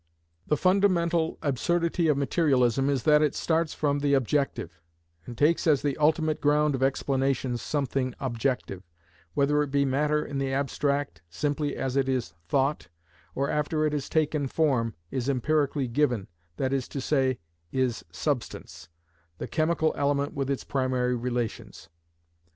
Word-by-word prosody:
The 150 - +2
fundamental 175 -3 +2
absurdity 170 +5 +1
of 150 -3 +3
materialism 135 -3 +2
is 135 -4 0
that 150 -1 +5
it 150 -2 +1
starts 165 -1 0
from 145 -1 0
the 140 0 +2
objective, 130 - -1 0.5
and 120 -2 -8
takes 160 +3 +2
as 145 -4 +3
the 145 -2 0
ultimate 155 0 +2
ground 150 0 +3
of 130 - -3
explanation 135 -1 0
something 130 -1 -2
objective, 125 -6 -2 0.5
whether 145 +1 +3
it 145 - -1
be 140 0 +2
matter 150 +3 +1
in 140 -1 -4
the 135 -1 -1
abstract, 140 - -1
simply 145 - -2
as 130 -1 -3
it 135 -1 +1
is 125 -11 -1
thought, 140 +2 0 0.5
or 140 +1 0
after 155 +1 0
it 150 - 0
has 145 -2 -3
taken 150 -2 +1
form, 130 -7 +1 0.2
is 130 0 -2
empirically 140 +1 +1
given—that 115 - -2
is 135 -2 -1
to 140 - -5
say, 130 -2 +1 0.3
is 130 -3 -1
substance, 120 - -4 0.5
the - - -4
chemical 160 0 +1
element 140 0 0
with 135 -1 -2
its 140 - -1
primary 130 -2 0
relations. 120 -1 -4
140 Hz, 145 wpm, -27 LUFS, 130-150 Hz, 0.5 s, that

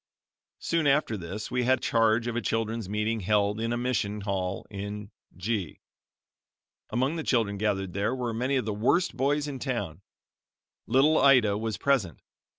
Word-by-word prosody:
Soon 165 -3 0
after 140 -5 +2
this 95 +3 -6
we 125 - +1
had 130 +2 +3
charge 115 0 +2
of 120 -1 -3
a 120 - 0
children's 115 -3 -2
meeting 105 +2 -1
held 105 +1 +1
in 115 +1 -1
a 120 - 0
mission 105 -4 -1
hall 95 -2 -2
in 100 +1 -6 0.3
G. 95 -2 -3 1.1
Among 130 +7 0
the 160 - -3
children 110 -7 +1
gathered 95 -3 -1
there 100 +6 0
were 125 -3 -2
many 125 +5 0
of 130 - 0
the 110 - -2
worst 130 - +1
boys 145 +3 +1
in 140 -3 -5
town. 100 - -3 0.9
Little 150 +4 +4
Ida 125 -7 +5
was 110 0 -3
present. 110 - 0
115 Hz, 160 wpm, -27 LUFS, 100-130 Hz, 1.1 s, Ida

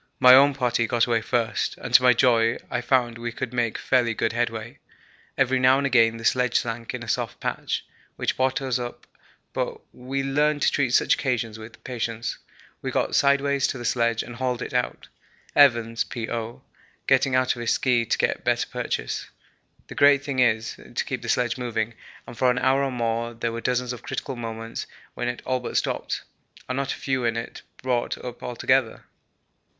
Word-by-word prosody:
My 125 0 +9
own 140 +1 +7
party 120 -3 +1
got 120 0 +2
away 115 -2 +1
first, 115 0 -1
and, - - -7
to - - +9
my 125 0 +6
joy, 115 -1 +3
I 125 - -1
found 120 -2 +1
we 120 0 -3
could 120 +1 -5
make 120 -2 0
fairly 120 -3 +1
good 110 - 0
headway. 115 -1 -3 0.6
Every 130 -1 +2
now 130 +1 +5
and 140 - 0
again 115 -4 +4
the 115 - -8
sledge 125 0 +3
sank 115 +1 -4
in 120 - -6
a - - -9
soft - - -2
patch, - - -3 0.3
which - - -1
brought 130 +1 0
us 130 -2 0
up, 120 0 -7 0.5
but - - -2
we 135 +2 -3
learned 145 +2 +1
to - - +4
treat 130 -3 +1
such - - +4
occasions 115 -4 -2
with 110 +1 -12
patience. 115 -2 -4 0.4
We - - -3
got - - -1
sideways 140 -1 +3
to - - -3
the 120 - -7
sledge 115 -2 +1
and 120 -1 -10
hauled 125 -1 -1
it - - -7
out, 125 0 -2 0.5
Evans 115 -5 +4
(P.O.) 115 0 -5 0.4
getting 135 -2 +3
out 130 0 +2
of - - -9
his 120 - +1
ski 125 -3 +2
to 115 - 0
get - - 0
better - - +1
purchase. - - -3 0.6
The - - -8
great 140 -1 +5
thing 140 -2 -3
is 110 -3 +2
to - - -5
keep - - -4
the - - -6
sledge 125 0 +1
moving, 115 -2 -2 0.3
and 120 - -10
for 125 +3 +3
an 125 - +1
hour 135 +2 +2
or 135 - -1
more 115 -1 -2
there 115 0 -2
were 115 0 -5
dozens 125 +1 0
of 120 - -9
critical 135 - -4
moments 115 -1 -6 0.3
when 120 - -3
it 120 0 -4
all 130 0 0
but 125 - -3
stopped, - - -2 0.4
and 130 - -2
not 135 0 -1
a - - -3
few 130 -2 -2
in 115 -1 0
it 115 - -6 0.2
brought 125 -2 0
up 125 -1 -8
altogether. 125 0 0
120 Hz, 195 wpm, -24 LUFS, 115-130 Hz, 0.6 s, My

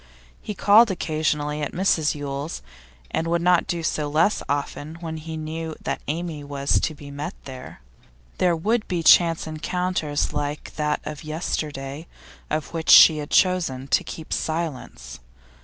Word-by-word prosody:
He 210 - -6
called 215 +4 +6
occasionally 155 -4 -1
at 145 - -3
Mrs 165 -5 +1
Yule's, 145 - -5 0.5
and 165 - -1
would 170 +1 +1
not 180 -1 +3
do 170 -1 -2
so 150 -2 -1
less 165 +8 +2
often 145 +2 -3
when 165 -1 -6
he 160 0 -6
knew 160 0 -5
that - - -3
Amy 160 0 -3
was 140 -1 0
to 155 - -2
be 145 0 -11
met 145 +1 -5
there. 130 - -10 0.6
There 175 -2 +3
would 215 +7 0
be 175 -2 -2
chance 165 0 +5
encounters 160 -1 -2
like 145 0 -4
that 150 -1 -1
of 150 0 -6
yesterday, 155 -1 -4 0.4
of 155 +2 -3
which 165 -1 -3
she 155 -1 +9
had 145 - -6
chosen 165 -8 +2
to - - +3
keep 160 - -7
silence. 130 - -4
155 Hz, 155 wpm, -23 LUFS, 145-170 Hz, 0.6 s, she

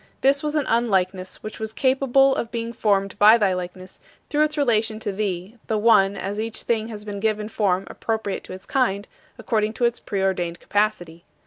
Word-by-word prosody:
This 275 +1 +3
was 300 0 -2
an 300 -3 +1
unlikeness 190 -5 0
which 215 - -7
was 220 0 -4
capable 270 +2 +3
of 230 - -3
being 235 0 -4
formed 200 -4 0
by 215 +3 +8
thy 200 -4 +2
likeness 180 +1 -7 0.3
through 305 0 +3
its 305 0 -4
relation 225 -5 +1
to 210 - -3
thee, 195 +1 -4
the 220 - 0
One, 200 -3 +4
as 200 +2 -4
each 225 0 -3
thing 225 -2 0
has 210 -2 -8
been 205 -1 -5
given 215 0 -1
form 195 -4 +1
appropriate 220 -3 -3
to - - -8
its 185 +1 -10
kind 205 -7 0 0.3
according 215 -1 -1
to 240 - 0
its 235 0 0
preordained 190 -4 -2
capacity. 175 -5 -1
215 Hz, 190 wpm, -23 LUFS, 195-235 Hz, 0.3 s, by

